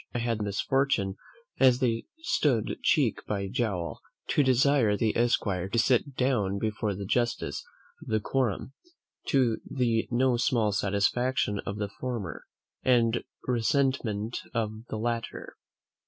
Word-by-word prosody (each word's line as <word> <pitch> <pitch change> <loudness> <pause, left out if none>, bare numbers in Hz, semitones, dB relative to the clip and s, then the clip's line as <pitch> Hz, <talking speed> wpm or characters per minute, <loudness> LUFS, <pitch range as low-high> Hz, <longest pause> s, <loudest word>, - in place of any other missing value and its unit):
I - - +2
had 115 -2 -1
the - - -2
misfortune, 100 -1 +1 0.4
as 130 -2 +6
they 115 -3 0 0.2
stood 130 - +1
cheek - - +2
by 100 -2 -2
jowl, 95 -7 -2 0.3
to - - +3
desire 130 -4 +3
the 110 -1 +1
esquire 100 -6 +1
to 115 - -1
sit 125 +3 +2
down 110 -8 +1
before 105 -1 -1
the 100 +1 -5
justice 120 +4 -1 0.4
of - - -12
the 110 -1 +1
quorum, 130 +2 -1 0.5
to 125 -5 +3
the 120 -4 0
no 125 0 +2
small 120 -4 +2
satisfaction 105 +3 +1
of 100 - -3
the 105 -1 -2
former, 115 - -4 0.4
and 120 -2 +3 0.2
resentment 120 -3 0 0.2
of 110 0 -2
the - - -3
latter. 115 +1 -3
115 Hz, 135 wpm, -28 LUFS, 105-125 Hz, 0.5 s, as